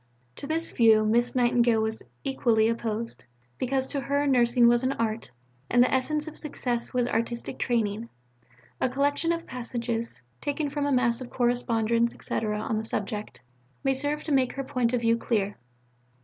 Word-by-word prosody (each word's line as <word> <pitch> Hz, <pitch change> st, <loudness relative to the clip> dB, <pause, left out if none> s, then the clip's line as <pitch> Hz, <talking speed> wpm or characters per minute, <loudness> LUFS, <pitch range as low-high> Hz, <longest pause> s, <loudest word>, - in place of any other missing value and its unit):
To 280 Hz, -, -6 dB
this 325 Hz, +2 st, -1 dB
view 220 Hz, -2 st, +5 dB
Miss 240 Hz, +3 st, +2 dB
Nightingale 240 Hz, -2 st, +3 dB
was 220 Hz, 0 st, -2 dB, 0.2 s
equally 235 Hz, -5 st, +2 dB
opposed, 230 Hz, 0 st, -3 dB, 0.3 s
because 260 Hz, +1 st, 0 dB
to 280 Hz, -, 0 dB
her 285 Hz, +1 st, 0 dB
Nursing 240 Hz, -2 st, +4 dB
was 240 Hz, 0 st, +4 dB
an 260 Hz, +1 st, 0 dB
Art, 225 Hz, -2 st, -2 dB, 0.4 s
and 245 Hz, 0 st, +5 dB
the 255 Hz, -, +1 dB
essence 300 Hz, +4 st, +1 dB
of 315 Hz, -, -6 dB
success 245 Hz, -5 st, -2 dB
was 250 Hz, -2 st, +1 dB
artistic 235 Hz, +1 st, -2 dB
training. 225 Hz, -2 st, -1 dB, 0.7 s
A -, -, +1 dB
collection 285 Hz, +5 st, +1 dB
of 335 Hz, 0 st, -2 dB
passages, 235 Hz, -, -3 dB, 0.2 s
taken 290 Hz, 0 st, -2 dB
from 290 Hz, 0 st, -1 dB
a -, -, 0 dB
mass 250 Hz, -2 st, +2 dB
of 250 Hz, -, -7 dB
correspondence, 235 Hz, -1 st, +1 dB
etc., 210 Hz, -1 st, -2 dB
on 220 Hz, 0 st, -1 dB
the -, -, -4 dB
subject, 210 Hz, -1 st, -4 dB, 0.4 s
may 270 Hz, -, +3 dB
serve 290 Hz, +3 st, -1 dB
to 310 Hz, -, -4 dB
make 260 Hz, -3 st, +2 dB
her 275 Hz, -, -4 dB
point 250 Hz, -3 st, 0 dB
of 245 Hz, -2 st, 0 dB
view 230 Hz, 0 st, +3 dB
clear. 205 Hz, -4 st, -1 dB
240 Hz, 170 wpm, -27 LUFS, 230-270 Hz, 0.7 s, view